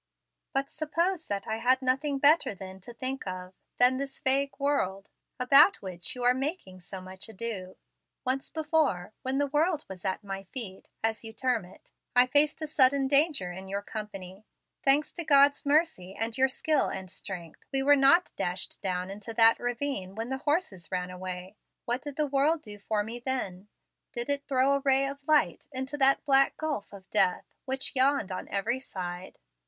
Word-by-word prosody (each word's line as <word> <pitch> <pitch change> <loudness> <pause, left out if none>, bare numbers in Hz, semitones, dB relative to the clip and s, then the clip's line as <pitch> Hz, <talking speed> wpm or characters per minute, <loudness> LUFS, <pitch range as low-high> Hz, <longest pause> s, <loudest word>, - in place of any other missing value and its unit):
But 275 0 0
suppose 325 +3 -1
that 200 -1 -3
I 220 - -1
had - - -9 0.2
had - - -32
nothing 275 +3 +1
better 290 -5 +4
then 190 0 -9
to 240 - -10
think 255 0 -5
of 185 0 -6 0.2
than 250 +1 +5
this 275 0 -5
vague 275 +1 +3
world, 235 -9 -1 0.3
about 275 +9 +6
which 180 +1 -4
you 250 - -5
are 245 +1 +5
making 260 - -4
so 190 +2 -7
much 185 +3 -9
ado? 200 -4 -5 0.5
Once 265 +1 -1
before, 300 - 0
when 260 +1 -2
the 285 - +2
world 300 +3 +1
was 190 -2 -10
at 190 +1 -2
my 195 -1 -5
feet, 205 -7 -6 0.2
as 225 0 0
you 220 0 -8
term 245 -4 0
it, 180 - -18 0.2
I 250 0 +7
faced 295 +4 +2
a - - 0
sudden 275 -2 +3
danger 280 - +2
in 190 +2 -8
your 200 +1 -3
company. 200 -3 -7 0.4
Thanks 280 +2 +2
to 340 - -2
God's 285 -1 +4
mercy 285 - +1
and 225 +1 -2
your 265 0 +3
skill 300 +2 +1
and 190 -1 -6
strength, 175 -5 -8
we 270 -1 +2
were 290 +1 +6
not 275 +6 +5
dashed 180 +1 -3
down 185 -1 -2
into 210 +3 -7
that 230 0 +6
ravine 245 -6 -3
when 225 +2 -4
the 265 0 -3
horses 290 - -1
ran 180 0 -2
away. 185 +2 -7 0.3
What 240 +2 -1
did 290 -1 -7
the 300 - +1
world 290 +3 +1
do 205 -2 -10
for 210 +1 -1
me 230 +3 -7
then? 210 -7 -4 0.5
Did 240 +2 -3
it 285 0 -2
throw 270 0 +3
a 280 - +2
ray 270 0 +3
of 280 0 -7
light 295 - +2
into 265 +1 -4
that 270 +2 +4
black 275 -1 +4
gulf 300 -9 -3
of 195 -1 -12
death, 195 -4 +1
which 265 +1 -1
yawned 260 -6 +2
on 185 - -5
every 225 +6 0
side? 180 -6 -7
250 Hz, 190 wpm, -29 LUFS, 195-280 Hz, 0.5 s, I